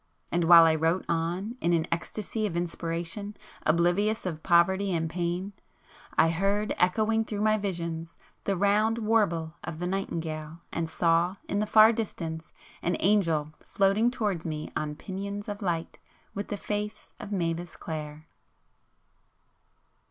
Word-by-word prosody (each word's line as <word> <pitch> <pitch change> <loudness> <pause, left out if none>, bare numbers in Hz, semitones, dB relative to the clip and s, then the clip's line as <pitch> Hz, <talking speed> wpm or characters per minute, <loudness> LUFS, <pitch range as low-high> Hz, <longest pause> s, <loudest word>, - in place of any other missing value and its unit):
And 170 -1 +1
while 170 0 +9
I 160 - +5
wrote 160 +3 +1
on 175 +8 -2
in 175 - +2
an 165 -1 +2
ecstasy 210 +5 -2
of 170 -4 -4
inspiration, 170 +4 -3 0.3
oblivious 175 +7 +2
of 160 -4 -3
poverty 190 +3 +3
and 165 -1 0
pain, 175 +4 -2 0.6
I 165 - +5
heard, 200 +5 0
echoing 220 +5 +2
through 210 -2 -4
my 215 0 +3
visions, 170 -4 -4 0.3
the 195 -2 0
round 210 +4 +3
warble 205 -8 +1
of 170 -2 -5
the 175 - -3
nightingale, 165 -4 -3
and 165 -1 -2
saw, 170 +2 +2
in 200 - -1
the 210 - 0
far 220 +2 +7
distance, 165 -8 -4 0.3
an 175 - 0
angel 165 -7 +2
floating 200 +4 +2
towards 210 -9 -2
me 155 -2 -4
on 150 -1 -2
pinions 200 +4 -5
of 205 0 -5
light, 170 -4 -2 0.3
with 200 +1 -4
the 205 - -3
face 210 +1 -4
of 215 -3 -8
Mavis 170 -2 -2
Clare. 155 -1 -6
175 Hz, 145 wpm, -28 LUFS, 165-205 Hz, 0.6 s, while